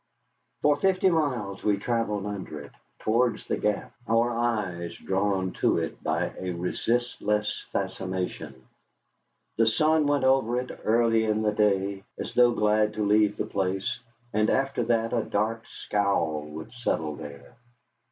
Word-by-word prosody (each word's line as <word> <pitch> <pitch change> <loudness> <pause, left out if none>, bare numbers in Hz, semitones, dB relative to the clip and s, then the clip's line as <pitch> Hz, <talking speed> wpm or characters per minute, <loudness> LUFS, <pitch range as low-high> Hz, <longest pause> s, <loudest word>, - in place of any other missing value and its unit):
For 145 -1 +4
fifty 190 +2 +3
miles 125 - -1
we 105 -1 +2
travelled 105 -2 -1
under 100 -7 -5
it, 75 - -11 0.3
towards 115 +1 +1
the - - 0
Gap, 105 -1 -1
our 115 +2 +3
eyes 105 -8 -2
drawn 95 -1 0
to - - +3
it - - -4
by - - -1
a 90 -1 -3
resistless 105 +3 -1
fascination. 90 -8 -4 0.9
The 115 0 +4
sun 155 +6 +3
went 145 -2 +2
over 130 -2 +3
it 125 - -5
early 115 0 +3
in 110 0 +1
the 105 - +2
day, 100 -2 +1
as - - -5
though 120 -1 +6
glad 105 -1 +2
to 105 - 0
leave 105 0 +3
the - - -1
place, 95 -1 -1 0.3
and 110 +1 +2
after 135 -1 +1
that 115 -1 +1
a 120 - +2
dark 110 +2 -2
scowl 100 -7 -1
would 80 +6 -9
settle 80 -11 -2
there. 70 -1 -10
105 Hz, 145 wpm, -27 LUFS, 95-120 Hz, 0.9 s, though